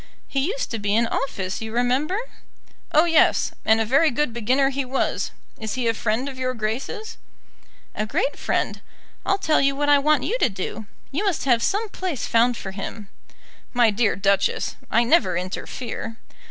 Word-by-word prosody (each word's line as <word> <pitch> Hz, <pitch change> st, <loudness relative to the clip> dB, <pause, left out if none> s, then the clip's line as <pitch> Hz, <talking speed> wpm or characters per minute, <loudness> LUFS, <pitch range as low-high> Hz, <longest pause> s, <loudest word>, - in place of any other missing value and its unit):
"He 270 Hz, -1 st, 0 dB
used -, -, -3 dB
to 230 Hz, -, -2 dB
be 205 Hz, 0 st, 0 dB
in 230 Hz, +1 st, +4 dB
office, 195 Hz, -6 st, -3 dB
you 220 Hz, 0 st, -5 dB
remember." 255 Hz, -, +1 dB, 0.7 s
"Oh 315 Hz, +1 st, +5 dB
yes; 330 Hz, -2 st, +4 dB
and 220 Hz, 0 st, +4 dB
a 225 Hz, -, +1 dB
very 275 Hz, +8 st, +4 dB
good 270 Hz, -1 st, -1 dB
beginner 255 Hz, +4 st, +2 dB
he 275 Hz, +1 st, -1 dB
was. 260 Hz, +1 st, -1 dB, 0.3 s
Is 220 Hz, -2 st, -3 dB
he 250 Hz, -2 st, -1 dB
a 230 Hz, -, +3 dB
friend 225 Hz, +4 st, -1 dB
of 265 Hz, -2 st, -7 dB
Your 255 Hz, 0 st, -1 dB
Grace's?" 265 Hz, -, -4 dB, 0.7 s
"A 215 Hz, -, -2 dB
great 370 Hz, -, 0 dB
friend. -, -, -1 dB, 0.5 s
I'll 390 Hz, -, +3 dB
tell 315 Hz, -6 st, +2 dB
you 275 Hz, 0 st, +2 dB
what 290 Hz, +1 st, 0 dB
I 290 Hz, -1 st, +6 dB
want 295 Hz, -1 st, +3 dB
you -, -, -1 dB
to -, -, +3 dB
do. 200 Hz, +2 st, -5 dB, 0.2 s
You 300 Hz, +9 st, -1 dB
must 390 Hz, -9 st, 0 dB
have 240 Hz, -4 st, +4 dB
some 410 Hz, -, 0 dB
place 370 Hz, -, -3 dB
found 235 Hz, +1 st, +3 dB
for 190 Hz, -, -6 dB
him." 200 Hz, +1 st, -7 dB, 0.6 s
"My 240 Hz, -3 st, +4 dB
dear 215 Hz, +1 st, +1 dB
Duchess, 200 Hz, 0 st, +1 dB
I 235 Hz, -, +4 dB
never 235 Hz, -, +3 dB
interfere." 225 Hz, +5 st, -5 dB
250 Hz, 180 wpm, -23 LUFS, 220-295 Hz, 0.7 s, I